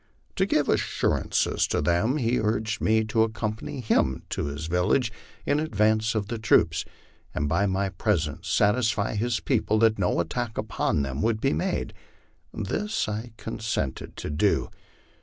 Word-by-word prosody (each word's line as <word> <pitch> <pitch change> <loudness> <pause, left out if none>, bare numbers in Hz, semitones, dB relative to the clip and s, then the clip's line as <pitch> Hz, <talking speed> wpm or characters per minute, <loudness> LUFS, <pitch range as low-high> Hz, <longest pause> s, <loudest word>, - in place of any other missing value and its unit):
To - - +2
give - - +2
assurance - - +1 0.2
to - - 0
them 85 - +2
he 120 -2 +1
urged 110 0 -1
me 110 0 +3
to 110 +1 +1
accompany 110 +2 -2
him 65 - +1
to - - -1
his 70 +2 -4
village 90 +9 +1 0.3
in 145 - +2
adrance 110 -5 +1
of 105 -2 0
the 115 0 -4
troops, 80 -7 +3 0.5
and 75 - 0
by 100 +7 +2
my 95 +1 0
presence 85 -6 -1
satisfy 110 0 +2
his 115 +1 0
pedple 110 +1 +1
that 110 -2 +4
no 90 -2 +1
attack 115 +5 -2
upon 70 - 0
them 70 +1 -3
would 115 +2 +1
be - - +1
made. 80 - -2 0.6
This 210 - -2
I 110 +2 -4
consented 110 - -3
to - - -4
do. 75 - +1
110 Hz, 155 wpm, -26 LUFS, 90-115 Hz, 0.6 s, that